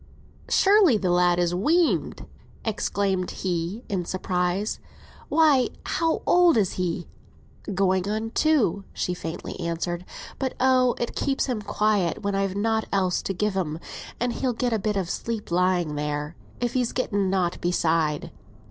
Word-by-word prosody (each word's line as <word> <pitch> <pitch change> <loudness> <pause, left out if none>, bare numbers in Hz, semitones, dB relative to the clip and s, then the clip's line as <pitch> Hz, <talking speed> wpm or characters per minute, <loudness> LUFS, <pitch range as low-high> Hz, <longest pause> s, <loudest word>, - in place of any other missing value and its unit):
"Surely 390 - +5
the 185 -3 0
lad 175 0 +3
is 175 0 +1
weaned!" 315 - +1 0.4
exclaimed 200 -4 -1
he, 180 +5 -3
in 190 -3 -1
surprise. 180 +2 -1 0.5
"Why, 295 -5 +4 0.2
how 330 -1 0
old 350 -5 +5
is 200 -4 +2
he?" 175 -1 -2 0.6
"Going 190 0 +1
on 220 +1 -2
two 310 - +1 0.3
year," 200 - -11
she 180 - -2
faintly 165 +1 -6
answered. 170 0 -3 0.4
"But, 265 -1 -2
oh! 255 -1 +4
it 240 - -3
keeps 270 -1 0
him 245 -5 -2
quiet 205 -4 0
when 200 0 -1
I've 195 -1 0
nought 220 +2 0
else 185 -2 +1
to 195 - -3
gi' 210 +4 +1
him, 180 -6 -2 0.4
and 245 0 0
he'll 255 -2 -1
get 240 +1 -1
a 220 - +1
bit 210 0 -1
of 190 -3 -1
sleep 220 +1 -4
lying 180 -3 +2
there, 150 +1 -3 0.2
if 240 -1 -1
he's 250 -2 0
getten 205 -6 0
nought 185 -2 0
beside. 165 -3 0
195 Hz, 155 wpm, -25 LUFS, 175-235 Hz, 0.6 s, Surely